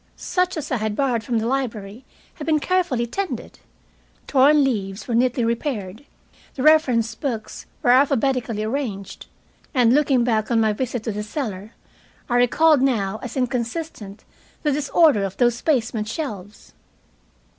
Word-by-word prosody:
Such 365 -1 -1
as 295 -2 -5
I 255 - +1
had 215 -1 -2
borrowed 250 -4 0
from 235 -1 -1
the 220 - -1
library 235 -3 -3 0.3
had 300 - -9
been 310 -1 +3
carefully 345 -9 0
tended. 385 +11 -5 0.7
Torn 285 +2 +4
leaves 205 -6 -2
were 240 - -2
neatly 245 0 +2
repaired. 230 -2 -3 0.5
The 260 - -3
reference 255 -8 +4
books 225 -2 -5 0.2
were 245 - +4
alphabetically 255 -4 +2
arranged. 215 -5 -4 0.5
And, 245 -2 +4
looking 275 -3 +3
back 220 -3 0
on 235 -2 +2
my 220 -1 +2
visit 245 0 -3
to 225 - -2
the 210 0 -4
cellar, 210 -3 -5 0.5
I 245 - +1
recalled 290 +4 +4
now 220 -6 0
as 255 - -7
inconsistent 245 -3 -4 0.4
the 300 - +2
disorder 290 - +3
of 195 -1 -4
those 240 -1 +2
basement 225 -7 0
shelves. 210 - -7
245 Hz, 145 wpm, -22 LUFS, 220-280 Hz, 0.7 s, Torn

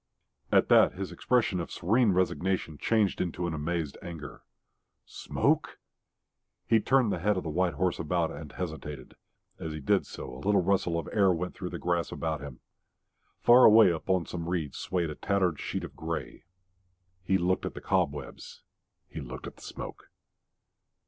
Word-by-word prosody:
At - - +4
that - - +6
his 95 0 -5
expression 120 -7 +1
of 85 - -4
serene 110 +5 +2
resignation 90 -3 0
changed 110 -4 +1
to 90 0 -2
an 85 - -2
amazed 80 -1 -3
anger. 80 -3 -8 0.6
Smoke? - - -1 0.9
He 115 - +4
turned 130 -1 +3
the 90 - -1
head 105 +3 +1
of 95 - -2
the 80 - -4
white 90 0 +1
horse 90 +2 0
about, 85 +1 0
and 75 -3 -8
hesitated. 80 -5 -6 0.5
And - - -5
as 80 - -5
he 75 - -5
did 70 - +1
so - - -8
a 65 - -9
little 100 -2 +3
rustle 90 -2 +1
of 85 - -4
air 100 -3 +4
went 90 +1 -2
through 90 - -6
the 90 - -5
grass 85 0 -1
about 80 -3 -3
him. 70 -3 -9 0.8
Far 125 +1 +8
away 110 -3 +8
upon 85 +1 0
some 85 -1 -5
reeds 80 -5 -2
swayed 85 -4 -1
a - - -6
tattered 95 -6 0
sheet - - -3
of - - -8
grey. - - -5 0.8
He 95 +1 +2
looked 95 +1 0
at - - -7
the - - -5
cobwebs; 70 -3 -2 0.4
he 80 - -7
looked 65 -1 -8
at - - -8
the - - -17
smoke. - - -8
90 Hz, 175 wpm, -29 LUFS, 80-95 Hz, 0.9 s, Far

